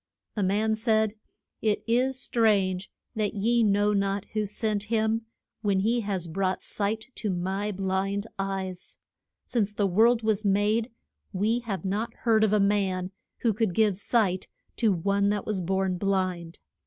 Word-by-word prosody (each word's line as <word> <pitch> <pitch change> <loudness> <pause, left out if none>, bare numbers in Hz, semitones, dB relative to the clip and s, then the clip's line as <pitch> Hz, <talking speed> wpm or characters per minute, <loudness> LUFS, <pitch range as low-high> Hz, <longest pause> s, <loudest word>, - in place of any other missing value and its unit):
The 210 - -2
man 210 +3 +2
said, 220 -1 +1 0.5
It 215 -2 +1
is 255 +3 +1
strange 200 -6 +2 0.2
that 215 -3 -1
ye 235 +4 +2
know 205 -1 +3
not 195 0 0
who 215 -1 0
sent 210 0 -1
him, 220 +1 0 0.3
when 200 -3 +1
he 230 +4 +2
has 200 -5 -2
brought 185 +3 -1
sight 215 +2 -2
to 215 - -3
my 190 +3 -1
blind 195 +1 -1
eyes. 190 -2 -4 0.5
Since 210 -4 0
the 205 -1 +1
world 225 +5 +4
was 215 -1 +1
made 210 +3 +2 0.4
we 215 +5 +1
have 205 -5 -5
not 205 +5 -2
heard 220 -2 +3
of 215 - +3
a 210 - +3
man 195 -2 +1 0.3
who 230 -3 +2
could 210 -4 0
give 215 -3 +3
sight 190 -2 0 0.3
to 225 -3 +3
one 200 +3 +1
that 205 -1 -1
was 205 -3 -1
born 190 0 0
blind. 185 -4 -1
205 Hz, 155 wpm, -27 LUFS, 190-220 Hz, 0.5 s, world